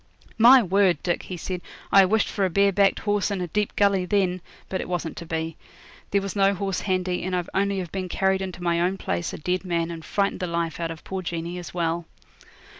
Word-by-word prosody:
'My 245 Hz, +2 st, +8 dB
word, 190 Hz, -1 st, +3 dB
Dick,' 175 Hz, -, 0 dB
he 180 Hz, -, -4 dB
said, 180 Hz, +1 st, -4 dB, 0.3 s
'I 195 Hz, -1 st, +8 dB
wished 215 Hz, +3 st, +2 dB
for 200 Hz, -, -2 dB
a 190 Hz, -, +2 dB
bare 200 Hz, +3 st, +3 dB
backed 195 Hz, 0 st, +3 dB
horse, 205 Hz, -1 st, +1 dB
and 200 Hz, -2 st, -2 dB
a 180 Hz, -, -1 dB
deep 205 Hz, +5 st, -2 dB
gully, 200 Hz, -2 st, +3 dB
then; 185 Hz, -2 st, +1 dB, 0.3 s
but 190 Hz, -, -2 dB
it -, -, -7 dB
wasn't 175 Hz, -2 st, -3 dB
to 170 Hz, -, -7 dB
be. 160 Hz, 0 st, -3 dB, 0.5 s
There 200 Hz, 0 st, +1 dB
was 195 Hz, 0 st, -4 dB
no 195 Hz, 0 st, +3 dB
horse 195 Hz, 0 st, -2 dB
handy, 185 Hz, -2 st, -1 dB
and 185 Hz, 0 st, -2 dB
I'd 180 Hz, -1 st, -2 dB
only 200 Hz, 0 st, +1 dB
have 180 Hz, -3 st, -4 dB
been 185 Hz, -2 st, -4 dB
carried 190 Hz, +1 st, +1 dB
into 185 Hz, -2 st, -5 dB
my 170 Hz, -1 st, +1 dB
own 185 Hz, +2 st, +1 dB
place 85 Hz, -, -2 dB
a -, -, -6 dB
dead 180 Hz, +4 st, -1 dB
man 170 Hz, -2 st, -1 dB
and 165 Hz, -1 st, -7 dB
frightened 200 Hz, +3 st, 0 dB
the 180 Hz, -, -2 dB
life 170 Hz, -1 st, -2 dB
out 165 Hz, -1 st, -2 dB
of 165 Hz, -1 st, -8 dB
poor 190 Hz, 0 st, -4 dB
Jeanie 170 Hz, 0 st, -4 dB
as 175 Hz, -, -9 dB
well.' 170 Hz, -1 st, -1 dB
185 Hz, 235 wpm, -25 LUFS, 170-195 Hz, 0.5 s, My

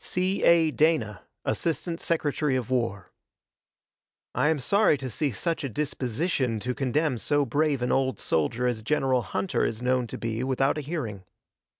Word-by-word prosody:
C. 185 Hz, +2 st, 0 dB
A. 165 Hz, -2 st, +5 dB
DANA, 120 Hz, -, +1 dB, 0.2 s
Assistant 165 Hz, +1 st, -2 dB
Secretary 150 Hz, -3 st, 0 dB
of 130 Hz, -1 st, -2 dB
War: 115 Hz, -7 st, -1 dB, 1.2 s
I 150 Hz, -, +2 dB
am 160 Hz, -, +2 dB
sorry 200 Hz, +4 st, +3 dB
to 130 Hz, -2 st, -5 dB
see 145 Hz, +7 st, 0 dB
such 165 Hz, -, -2 dB
a 140 Hz, -, -2 dB
disposition 130 Hz, -, -1 dB
to 125 Hz, +3 st, -2 dB
condemn 135 Hz, 0 st, 0 dB
so 145 Hz, +7 st, +1 dB
brave 145 Hz, +1 st, +1 dB
an 125 Hz, -, 0 dB
old 130 Hz, -1 st, +1 dB
soldier 80 Hz, +11 st, 0 dB
as 120 Hz, -3 st, 0 dB
General 130 Hz, 0 st, +1 dB
Hunter 120 Hz, -, -1 dB
is 110 Hz, -, -1 dB
known 125 Hz, 0 st, +1 dB
to -, -, -6 dB
be 115 Hz, +1 st, -3 dB
without 135 Hz, +3 st, +1 dB
a -, -, -3 dB
hearing. 130 Hz, -, -4 dB
130 Hz, 165 wpm, -27 LUFS, 120-155 Hz, 1.2 s, A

